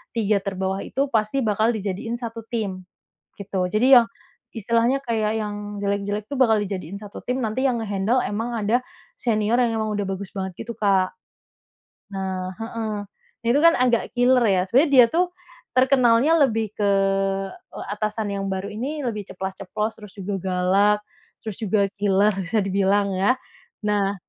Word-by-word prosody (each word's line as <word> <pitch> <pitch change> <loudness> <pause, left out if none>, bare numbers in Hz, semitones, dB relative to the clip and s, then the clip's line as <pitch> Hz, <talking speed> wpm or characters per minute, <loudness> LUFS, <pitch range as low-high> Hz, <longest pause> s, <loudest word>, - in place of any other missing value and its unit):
3 215 -2 +2
terbawah 190 0 -2
itu 275 - 0
pasti 220 +4 +1
bakal 215 +1 +2
dijadiin 210 +2 -3
satu 230 -1 -6
tim, 205 -6 -3 0.6
gitu. 190 -2 -2
Jadi 240 +8 +4
yang, 235 -1 +5 0.5
istilahnya 235 +4 +1
kayak 220 -3 0
yang 210 -1 -4 0.3
jelek-jelek 200 +1 -1
tuh - - -5
bakal 225 -4 +5
dijadiin 185 -1 -5
satu 205 0 -9
tim, 250 +1 -1
nanti 220 +4 -2
yang 250 -2 +1
nge-handle 210 +4 +1
memang 225 +4 -3
ada 235 +4 +2 0.4
senior 220 -1 +1
yang 230 -2 +1
memang 215 -1 -1
udah 205 -1 -1
bagus 200 -1 -7
banget 190 -1 -3
gitu, 235 - -5
Kak. 195 -4 +2 1.0
Nah 190 -1 -3
heeh, 225 -1 -4 0.5
nah - - -4
itu 240 - +4
kan 335 - +8
agak 245 -2 +2
killer 250 0 +4
ya, 190 -3 +3
sebenarnya 275 - +3
dia 250 -2 +9
tuh 355 +2 +1 0.4
terkenalnya 255 +2 +4
lebih 225 -5 0
ke, 205 -1 +1 0.6
eee, - - -11
atasan 215 +1 -2
yang 195 0 -3
baru 190 +1 -3
ini 270 +8 -4
lebih 210 -4 -3
ceplas-ceplos, 195 +3 -4
terus 210 -2 -11
juga 195 +1 -3
galak, 190 +3 +3 0.5
terus 220 -3 -5
juga 205 -2 +1
killer 200 +1 +3
bisa 205 +5 0
dibilang, 195 +1 +1
ya. 200 +7 +3 0.5
Nah, 200 -1 +1
210 Hz, 160 wpm, -23 LUFS, 195-235 Hz, 1.0 s, dia